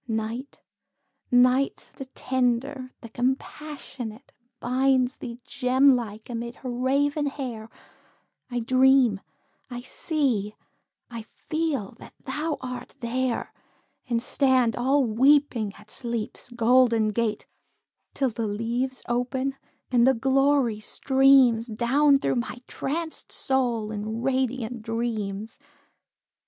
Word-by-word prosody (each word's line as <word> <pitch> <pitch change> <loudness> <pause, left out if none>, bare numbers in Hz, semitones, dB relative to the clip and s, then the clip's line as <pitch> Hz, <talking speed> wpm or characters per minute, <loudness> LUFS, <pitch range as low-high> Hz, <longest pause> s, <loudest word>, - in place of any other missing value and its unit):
Night 225 +4 -4 0.7
Night 255 +2 +3
the 270 - -6
tender, 255 +1 -1
the 230 - -10
compassionate, 260 -1 -4 0.3
Binds 260 0 +1
thee, 235 -1 -7
gem 265 0 +4
like, 220 -3 -5
amid 235 0 -5
her 255 - -6
raven 280 +4 +1
hair; 245 -6 -5 0.8
I 245 -1 -2
dream 255 -3 +4 0.5
I 245 -1 -6
see 250 - -1 0.6
I 230 -1 -5
feel 300 -2 -3
that - - -13
thou 300 +3 -2
art 250 +1 -7
there 250 0 -2 0.6
And 235 -1 +1
stand 255 -4 +2
all 270 +3 +2
weeping 245 -2 +3
at 210 +1 -12
Sleep's 235 -2 -3
golden 235 -2 +3
gate, 215 0 -1 0.7
Till 270 -2 +1
the 225 0 -3
leaves 235 +5 -2
open, 260 +3 -1 0.4
and 245 -1 +4
the 265 - +5
glory 270 -2 +2
streams 265 -1 +4
Down 265 +6 +3
through 275 - -1
my 240 +1 -3
trancèd 320 +3 -4
soul 240 -5 0
in 220 +2 -4
radiant 255 -3 -1
dreams. 220 -2 -3
250 Hz, 110 wpm, -25 LUFS, 230-270 Hz, 0.8 s, the